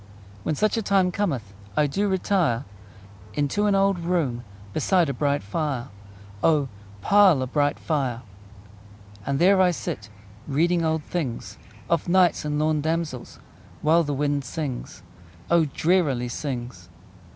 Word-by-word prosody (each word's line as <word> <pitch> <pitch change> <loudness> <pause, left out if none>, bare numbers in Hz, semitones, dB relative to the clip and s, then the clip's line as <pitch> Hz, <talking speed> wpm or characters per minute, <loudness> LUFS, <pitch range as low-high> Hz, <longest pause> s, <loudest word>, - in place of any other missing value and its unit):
When 155 - -1
such 215 +7 +1
a - - +1
time 195 -3 +2
cometh 135 - -2 0.2
I 150 - +4
do 195 +9 0
retire 180 -10 +1 0.7
Into 150 +9 +1
an 200 - +3
old 195 -1 +2
room 165 -9 -1 0.3
Beside 180 - +2
a - - -1
bright 145 0 0
fire: 130 +3 -3 0.5
O, 150 -4 +3 0.3
pile 195 - +5
a - - -1
bright 145 +2 0
fire! 130 -6 -2 1.0
And 140 - 0
there 190 +4 +5
I 185 - +5
sit 105 - -4 0.4
Reading 165 +4 +2
old 160 -1 0
things, 145 -10 -4 0.3
Of 170 0 0
knights 180 -1 +4
and 150 0 -2
lorn 155 0 +1
damsels, 160 -5 -3 0.5
While 160 +3 +5
the 145 -2 -2
wind 145 0 0
sings 130 - -5 0.5
O, 170 -2 +5
drearily 145 -5 +1
sings! 120 - -5
150 Hz, 140 wpm, -24 LUFS, 135-175 Hz, 1.0 s, pile